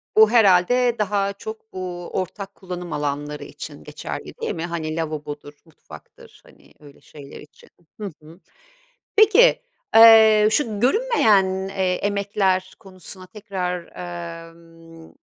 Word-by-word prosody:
Bu 220 Hz, 0 st, +7 dB
herhâlde 230 Hz, +3 st, +4 dB
daha 200 Hz, -1 st, 0 dB
çok 220 Hz, +2 st, -10 dB
bu 180 Hz, -2 st, -6 dB
ortak 195 Hz, +2 st, -5 dB
kullanım 180 Hz, -3 st, -7 dB
alanları 145 Hz, 0 st, -4 dB
için 75 Hz, -, -10 dB
geçerli, -, -, -8 dB
değil -, -, -3 dB
mi? 165 Hz, -, -4 dB
Hani, 160 Hz, -2 st, -4 dB
lavabodur, 150 Hz, -2 st, -6 dB
mutfaktır, 160 Hz, -, -16 dB
hani, -, -, -22 dB
öyle 145 Hz, -2 st, -17 dB
şeyler 140 Hz, -2 st, -13 dB
için. 150 Hz, -, -18 dB, 0.3 s
Hı 205 Hz, -4 st, -5 dB
hı. 165 Hz, +3 st, -15 dB, 0.8 s
Peki, 445 Hz, +4 st, +5 dB, 0.3 s
eee, 220 Hz, -1 st, +8 dB
şu 220 Hz, -4 st, -1 dB
görünmeyen, 215 Hz, -, +2 dB
eee, 190 Hz, -2 st, -1 dB
emekler 200 Hz, -2 st, -1 dB
konusuna 185 Hz, -2 st, -12 dB
tekrar, 180 Hz, -3 st, -5 dB, 0.6 s
emm, 165 Hz, -1 st, -17 dB
190 Hz, 120 wpm, -22 LUFS, 165-210 Hz, 0.8 s, eee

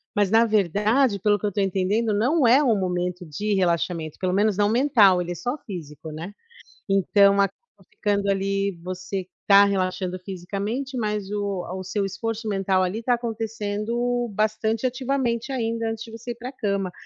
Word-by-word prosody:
Mas 205 Hz, -2 st, +2 dB
na 225 Hz, +1 st, +5 dB
verdade, 210 Hz, -, +2 dB
pelo 205 Hz, +1 st, +3 dB
que 210 Hz, -, -4 dB
eu -, -, +2 dB
estou 200 Hz, 0 st, -1 dB
entendendo, 200 Hz, +4 st, 0 dB
não 255 Hz, +7 st, +2 dB
é 260 Hz, +5 st, +6 dB
um 230 Hz, -6 st, +3 dB
momento 180 Hz, -1 st, -2 dB
de 205 Hz, +8 st, -2 dB
relaxamento, 170 Hz, -3 st, 0 dB
pelo 185 Hz, -1 st, 0 dB
menos 205 Hz, 0 st, +2 dB
não 205 Hz, 0 st, +3 dB
mental, 225 Hz, -7 st, +4 dB
ele 175 Hz, 0 st, -4 dB
é -, -, -4 dB
só 245 Hz, -, -3 dB
físico, 160 Hz, -, -8 dB
né. 165 Hz, +6 st, -7 dB, 0.6 s
Então 200 Hz, +1 st, +4 dB
acaba 200 Hz, -1 st, +3 dB, 0.4 s
ficando 205 Hz, -, 0 dB
ali 195 Hz, 0 st, 0 dB
você 185 Hz, +1 st, -5 dB, 0.2 s
está 200 Hz, 0 st, +7 dB
relaxando 185 Hz, -2 st, -1 dB
fisicamente, 205 Hz, +8 st, -4 dB
mas 210 Hz, -3 st, -2 dB
o 200 Hz, -3 st, -2 dB
a 180 Hz, -, -6 dB
o 185 Hz, -, -5 dB
seu 200 Hz, +2 st, -2 dB
esforço 225 Hz, +3 st, -4 dB
mental 195 Hz, -1 st, +1 dB
ali 190 Hz, +5 st, -2 dB
está 245 Hz, +2 st, +1 dB
acontecendo 230 Hz, +1 st, -2 dB
bastante 220 Hz, +3 st, 0 dB
ativamente 255 Hz, -1 st, -1 dB
ainda 230 Hz, -2 st, -1 dB
antes 225 Hz, 0 st, -5 dB
de 225 Hz, -, -11 dB
você 230 Hz, +2 st, -7 dB
ir -, -, -6 dB
para 245 Hz, +2 st, -7 dB
cama. 200 Hz, -7 st, -2 dB
205 Hz, 175 wpm, -24 LUFS, 190-230 Hz, 0.6 s, está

